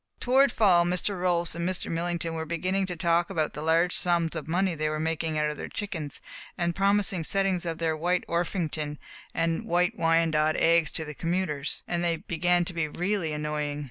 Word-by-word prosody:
Toward 265 +1 +4
fall 185 -7 +4
Mr. 180 +2 -1
Rolfs 175 -2 +1
and 170 +2 -2
Mr. 185 - -1
Millington 170 0 -2
were 160 0 -3
beginning 185 +4 0
to 180 - -4
talk 170 0 +1
about 160 -5 -1
the 150 - -6
large 165 +3 +2
sums 170 -2 0
of 155 -2 -5
money 180 +2 +1
they 155 -1 -1
were 155 0 -2
making 160 0 -1
out 150 0 +1
of 150 - -8
their - - -6
chickens, 170 -9 -5 0.4
and 170 0 0
promising 195 -3 +2
settings 190 0 0
of 165 -1 -2
their 165 -1 0
White 175 +3 0
Orpington 165 -3 -2 0.4
and 165 0 0
White 175 +1 +1
Wyandotte 165 -2 +2
eggs 165 -2 +4
to 160 - -4
the 150 - -7
commuters, 165 -3 -2
and 175 0 -1
they 170 -1 +2
began 175 +2 +1
to 175 - -6
be 165 -2 -1
really 180 +1 -1
annoying. 150 -1 -2
170 Hz, 195 wpm, -27 LUFS, 160-180 Hz, 0.4 s, Toward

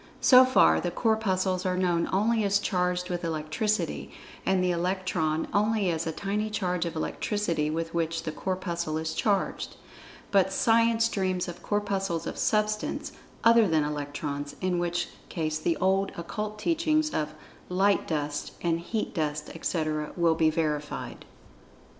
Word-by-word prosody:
So 255 -1 +8
far 80 - +5
the - - -1
Corpuscles 190 -3 0
are 185 -1 0
known 175 -2 +1
only 220 +4 +2
as[Pg 200 -2 +1
74] - - +5
charged 180 -1 0
with 175 0 -3
Electricity, 165 +7 -1 0.4
and 190 -1 +3
the 180 - +2
Electron 170 -3 -1
only 210 -2 +2
as 165 0 -2
a - - 0
tiny 205 +5 -2
charge 180 -4 -1
of 165 - -6
Electricity 165 -2 -1
with 165 +1 -3
which 165 -1 -1
the 160 - -3
Corpuscle 170 -3 -2
is 160 0 -2
charged. 200 -3 -1 0.6
But 190 -1 +4
Science 230 +2 +3
dreams 185 -4 -1
of 175 0 -7
Corpuscles 195 -4 -1
of - - -5
Substance 215 0 0 0.3
other 230 -2 +6
than 160 -3 +2
Electrons, 145 -1 -4
in 180 -1 0
which 175 0 -1 0.2
case 155 -2 -2
the 165 +1 0
old 190 +1 +1
Occult 210 +5 -4
teachings 310 +4 +1
of 155 0 -2 0.3
"light 195 +2 +2
dust" 145 -2 -2
and 165 -1 +1
"heat 215 +6 -3
dust," 150 -3 -2
etc., 155 -2 -2
will 170 -1 +4
be 160 0 +3
verified. 150 -2 -3
180 Hz, 150 wpm, -28 LUFS, 160-205 Hz, 0.6 s, So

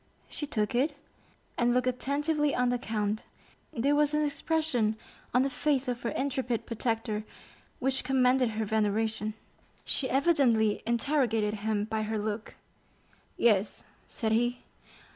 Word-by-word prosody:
She 295 - -4
took 215 -6 -1
it, 280 +4 +1 0.6
and 240 0 +3
looked 250 0 +2
attentively 290 +4 0
on 250 0 +2
the 245 0 0
count; 215 -1 -1 0.5
there 275 +5 +1
was 295 0 +3
an 300 0 +2
expression 290 -7 0 0.4
on 250 +2 +4
the 275 - +1
face 275 0 0
of 245 -1 -2
her 235 - -1
intrepid 260 -4 -1
protector 225 -2 -1 0.5
which 265 +1 0
commanded 255 -1 +3
her 220 - 0
veneration. 215 0 0 0.5
She 260 - -1
evidently 255 -7 +3
interrogated 235 -4 +1
him 210 0 0
by 220 0 -2
her 215 0 -2
look. 210 +1 -4 0.8
"Yes," 210 -3 +2 0.2
said 220 -3 -2
he. 240 +2 +1
240 Hz, 135 wpm, -29 LUFS, 220-275 Hz, 0.8 s, on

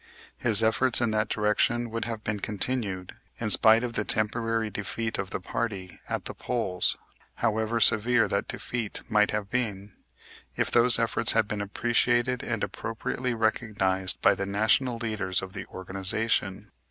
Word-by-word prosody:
His 115 -2 +4
efforts 120 +3 +3
in 120 -2 +1
that 110 0 0
direction 115 +3 0
would 115 0 -3
have 115 -2 -5
been 105 -1 -2
continued, 105 -3 -3 0.3
in 110 -2 -1
spite 110 +3 +5
of 120 -1 -3
the 105 - 0
temporary 110 +1 -1
defeat 110 +3 -4
of 95 - -3
the - - -3
party 95 -2 -4
at - - -3
the - - -4
polls, 105 -7 -1 0.4
however 110 +1 0
severe 115 +2 +5
that 100 - -1
defeat 115 -4 -4
might 105 -1 +3
have 105 -1 -3
been, 105 -5 -3 0.6
if - - -1
those 120 0 +5
efforts 115 -1 +1
had 110 -2 +2
been 105 0 -3
appreciated 120 +4 +1
and 110 -3 -3
appropriately 120 +2 -3
recognized 105 -4 +1
by 95 - +6
the 100 0 -4
national 110 +5 +1
leaders 105 -5 -1
of 95 0 -8
the 95 -2 -7
organization. 95 +1 -2
110 Hz, 155 wpm, -27 LUFS, 100-115 Hz, 0.6 s, by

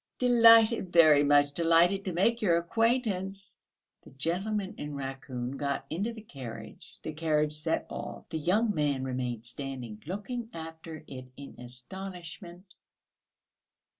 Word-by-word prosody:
"Delighted, 230 -5 +6
very 155 -4 +7
much 145 0 +4
delighted 170 +5 +3
to 185 - -1
make 215 +7 +1
your 175 -6 +3
acquaintance!..." 200 -1 -1 0.4
The - - -15
gentleman 185 +8 -2
in 145 0 -5
raccoon 135 -2 -5
got 140 0 -2
into 200 +9 -1
the 220 -2 -10
carriage, 115 - -10
the 155 - -5
carriage 150 -1 +1
set 150 +2 -1
off, - - -7
the 160 - -3
young 210 +8 +2
man 145 -5 0
remained 125 -3 -3
standing 125 -4 -5
looking 225 +6 -5
after 160 -1 -8
it 130 -2 -9
in 140 - -10
astonishment. 175 - -7
165 Hz, 130 wpm, -29 LUFS, 140-195 Hz, 0.4 s, very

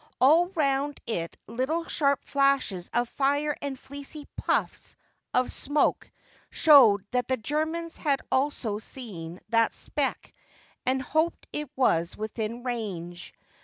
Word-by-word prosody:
All 320 +7 +6
round 280 -1 0
it 170 -8 -3
little 260 +9 -1
sharp 280 -3 +1
flashes 275 -10 +1
of 240 +1 +1
fire 285 +3 0
and 280 -2 -4
fleecy 285 +3 -8
puffs - - -1 0.4
of 250 0 +1
smoke 290 +2 0 0.4
showed 235 - +6
that 250 -1 0
the 260 - +1
Germans 315 +7 -2
had 280 -3 +1
also 260 -6 0
seen 185 -9 -8
that 230 0 +3
speck - - -3 0.5
and 260 0 +1
hoped 315 +5 0
it 300 -2 -3
was 170 -10 +2
within 220 +2 -4
range. 185 -8 -5
265 Hz, 125 wpm, -27 LUFS, 220-290 Hz, 0.5 s, All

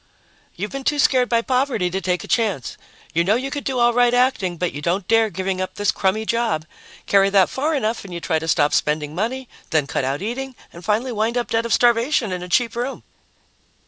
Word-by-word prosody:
"You've 205 +4 -4
been 275 0 -5
too 295 +2 +1
scared 255 -3 +3
by 230 -1 +2
poverty 250 -8 0
to 190 +2 -2
take 180 0 -1
a - - -9
chance. 205 - 0 0.4
You 170 - +2
know 200 +5 +3
you 265 +3 -3
could 290 0 -4
do 265 -2 -2
all 240 0 +4
right 245 0 +3
acting, 245 -9 +1
but 180 +1 -2
you 145 - -6
don't 175 +4 -1
dare 225 -1 +3
giving 190 -1 -3
up 185 - -4
this 205 -2 +1
crummy 200 +3 0
job. 230 -9 0 0.4
Carry 195 0 +4
that 195 -2 +4
far 305 +4 0
enough 225 -3 -1
and 195 - -10
you 170 - -4
try 165 -2 0
to 160 - -6
stop 145 -2 +2
spending 150 0 0
money, 240 +8 -3 0.2
then 155 -4 +2
cut 140 - -2
out 135 +6 -2
eating, 260 +4 -4 0.2
and 170 - -11
finally 220 +6 0
wind 225 +2 -1
up 240 - -2
dead 230 +1 +1
of - - -7
starvation 240 -1 +2
in 180 -1 -3
a 180 - -7
cheap 230 +5 +1
room." 245 +3 -4
220 Hz, 230 wpm, -21 LUFS, 180-245 Hz, 0.4 s, all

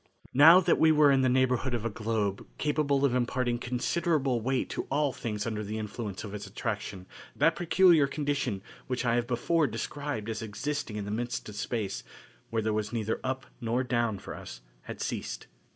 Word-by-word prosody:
Now 160 +7 +9
that - - +2
we 160 - +6
were 150 -2 +6
in 135 -1 +4
the 130 - +3
neighborhood 130 0 +2
of 115 -1 -3
a - - +1
globe 105 -2 -2
capable 145 -2 +1
of 130 - +2
imparting 125 -1 0
considerable 135 +1 0
weight 130 +3 0
to - - -3
all 145 -1 +1
things 105 -3 -3
under 110 -2 -2
the 105 +2 -4
influence 105 -2 -5
of 105 -2 -7
its 100 -1 -6
attraction 105 -2 -4 0.3
that 165 0 +3
peculiar 170 -2 +5
condition 140 -9 -2 0.2
which 125 0 -2
I 115 - +3
have 120 0 +1
before 145 +6 +2
described 140 -8 -4
as 110 0 -3
existing 115 +3 -3
in 105 -1 -3
the 100 - -4
midst 120 +2 -3
of 105 - -9
space, 105 -2 -3 0.5
where 115 -1 -1
there 110 0 0
was 105 -1 -1
neither 110 -1 -1
up 130 0 -2 0.2
nor 120 +2 0
down 120 -4 0
for 95 - -8
us, - - -9 0.2
had - - -7
ceased. - - -4
120 Hz, 190 wpm, -29 LUFS, 110-140 Hz, 0.5 s, Now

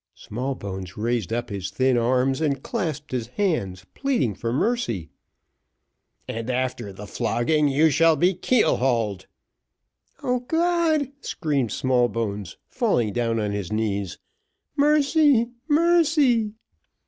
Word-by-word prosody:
Smallbones 100 -7 -5
raised 115 -2 -1
up 120 -1 -2
his 100 -1 -4
thin 130 +6 +1
arms, 130 +4 +1
and 140 -4 0
clasped 155 - -3
his 120 -3 -2
hands, 115 - -2
pleading 250 - 0
for 115 +3 -4
mercy. 125 - -1 1.2
"And 115 +2 -4
after 125 -5 -2
the 100 +2 -9
flogging 145 +8 +1
you 150 +3 +3
shall 165 +3 +4
be 175 +6 +3
keel 235 +6 +2
hauled." 115 -7 0 1.0
"O 250 0 +1
God!" 320 0 +1
screamed 140 - -1
Smallbones, 115 -7 -1
falling 110 -4 0
down 115 -2 0
on 105 -1 -1
his 100 -4 -4
knees, 100 -4 -2 0.6
"mercy 290 -4 +3 0.2
mercy!" 300 -9 +3
130 Hz, 115 wpm, -24 LUFS, -, 1.2 s, shall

